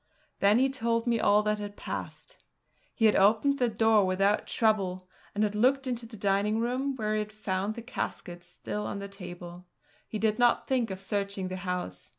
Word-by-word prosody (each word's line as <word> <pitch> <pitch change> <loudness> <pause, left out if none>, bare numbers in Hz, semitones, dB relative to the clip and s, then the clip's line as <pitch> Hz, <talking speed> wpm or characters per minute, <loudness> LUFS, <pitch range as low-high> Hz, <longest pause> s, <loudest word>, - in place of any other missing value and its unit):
Then 200 +2 +5
he 265 +2 +4
told 235 -3 -1
me 235 -2 +1
all 210 0 +4
that 210 0 0
had 205 0 -6
passed. - - -7 0.6
He 225 - +2
had 215 - +5
opened 225 +8 +4
the 245 -2 +2
door 220 -1 +4
without 195 +2 +1
trouble, 190 -5 0 0.3
and 210 - +1
had 210 -1 0
looked 260 +5 +2
into 240 -2 -3
the 225 -1 -11
dining 200 +2 +1
room 255 +4 -1
where 215 -3 -1
he 215 - +1
found 210 -1 -3
the 235 - -7
caskets 175 -7 -5
still 210 0 -5
on - - -4
the 200 0 -5
table. 180 -2 -9 0.4
He 215 - -4
did 215 +1 0
not 240 -1 +3
think 250 -4 +1
of 190 0 -6
searching 200 -1 -2
the 185 - -4
house. 180 - -4
210 Hz, 190 wpm, -29 LUFS, 195-230 Hz, 0.6 s, Then